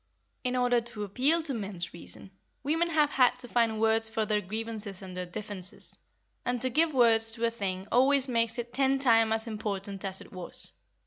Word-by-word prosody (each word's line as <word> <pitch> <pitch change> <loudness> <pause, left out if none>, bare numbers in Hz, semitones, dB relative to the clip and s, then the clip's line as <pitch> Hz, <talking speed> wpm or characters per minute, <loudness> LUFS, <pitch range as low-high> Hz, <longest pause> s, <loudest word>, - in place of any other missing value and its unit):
In 250 0 -1
order 245 -1 +2
to 230 -3 -6
appeal 270 - +2
to 295 -4 +2
men's 195 -6 -4
reason, 170 +3 -9 0.3
women 325 +4 +1
have 305 -3 +2
had 250 -1 +3
to 250 0 -3
find 230 -2 +1
words 225 0 +2
for 220 0 -1
their 210 0 0
grievances 215 -1 -5
and 185 -1 -9
their 180 0 -4
differences, 200 -1 -2 0.5
and 245 0 -1
to 255 +2 0
give 320 +4 +3
words 230 -4 +5
to 230 0 -1
a 230 - +1
thing 195 -4 -4
always 270 +2 +5
makes 230 -2 0
it 240 0 -6
ten 270 0 +2
times 225 -4 +3
as 220 +1 +1
important 200 -3 -4
as 190 -1 -1
it - - -13
was. 180 -2 -4
225 Hz, 195 wpm, -28 LUFS, 205-250 Hz, 0.5 s, words